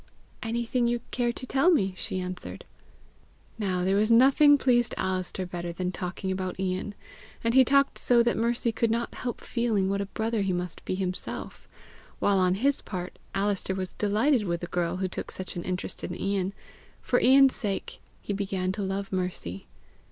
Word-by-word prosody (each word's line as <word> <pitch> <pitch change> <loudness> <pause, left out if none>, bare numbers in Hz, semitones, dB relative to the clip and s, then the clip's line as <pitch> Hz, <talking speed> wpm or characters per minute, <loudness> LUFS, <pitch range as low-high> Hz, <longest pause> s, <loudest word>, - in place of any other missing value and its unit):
"Anything 235 +1 0
you 240 0 0
care 240 -1 +1
to 255 - -6
tell 270 +6 +3
me," 195 - +3
she 185 - -2
answered. 180 0 -6 0.9
Now 185 -4 0
there 190 +2 +2
was 215 +2 +3
nothing 275 +5 +7
pleased 240 -3 +2
Alister 185 0 -2
better 175 -1 -5
than 180 +1 -2
talking 185 +1 -4
about 185 -1 -3
Ian; 190 +2 -2 0.5
and 230 0 +1
he 260 +1 +8
talked 275 +2 +3
so 240 -1 +4
that 235 - +1
Mercy 235 +1 +1
could 225 +1 0
not 235 +1 -1
help 245 -1 -4
feeling 225 -5 0
what 200 0 0
a 200 - -3
brother 220 +1 -1
he 195 -2 0
must 180 -1 -4
be - - -1
himself; 185 -1 -4 0.5
while 200 -1 +2
on 185 0 +3
his 275 +7 +1
part 180 -2 -6 0.2
Alister 195 -1 0
was 185 -1 -4
delighted 215 +5 +2
with 170 -2 -2
the - - -3
girl 175 0 -1
who 190 0 -1
took 185 - -5
such 185 - -6
an 175 - -4
interest 185 0 -4
in 175 - -5
Ian: 195 -1 -1 0.5
for 245 - +1
Ian's 270 +1 +7
sake 200 -4 -4 0.2
he 205 - -2
began 195 -2 -1
to 205 - -4
love 195 0 -3
Mercy. 180 - -3
200 Hz, 180 wpm, -27 LUFS, 185-235 Hz, 0.9 s, he